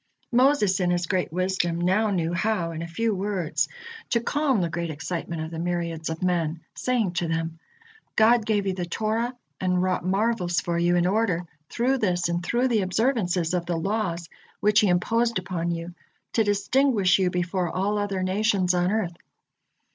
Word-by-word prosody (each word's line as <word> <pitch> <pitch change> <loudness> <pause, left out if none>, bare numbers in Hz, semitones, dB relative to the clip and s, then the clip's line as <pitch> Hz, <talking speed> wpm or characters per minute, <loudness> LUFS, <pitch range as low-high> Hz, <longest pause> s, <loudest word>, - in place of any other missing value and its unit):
Moses 245 -7 +3
in 180 -1 +1
his 175 0 +1
great 185 -2 -1
wisdom 180 -1 0
now 190 +5 +2
knew 175 -4 0
how, 185 -3 0
in 165 0 -5
a 170 - -4
few 225 +6 -1
words, 190 -4 -1 0.4
to 235 - +2
calm 275 0 +1
the 175 - +1
great 170 0 -3
excitement 160 +1 -4
of 160 - -6
the 165 - -5
myriads 170 -2 -2
of 160 +2 -4
men, 170 -3 0
saying 240 -7 0
to 175 -1 -1
them: 165 0 -2 0.6
"God 225 +1 +5
gave 210 -2 0
you 190 - 0
the 180 -2 -4
Torah 225 +6 -1 0.2
and 180 -1 +1
wrought 185 -1 0
marvels 190 -2 +1
for 170 -1 -1
you, 175 +1 +3
in 175 0 +3
order, 185 -3 +1 0.2
through 260 +3 +1
this 180 -5 +1
and 170 0 -1
through 245 +7 +1
the 225 -4 +2
observances 185 -4 0
of 175 -1 -1
the 175 -1 0
laws 175 -2 -2 0.3
which 210 0 +4
He 210 - +3
imposed 230 +6 +2
upon 175 -2 -2
you, 170 +1 -4 0.4
to 225 - +3
distinguish 205 -1 +2
you 185 -1 +2
before 180 0 -1
all 200 +4 0
other 200 -2 -1
nations 190 -1 +2
on 180 0 +2
earth. 210 -5 -1
185 Hz, 180 wpm, -25 LUFS, 175-215 Hz, 0.6 s, God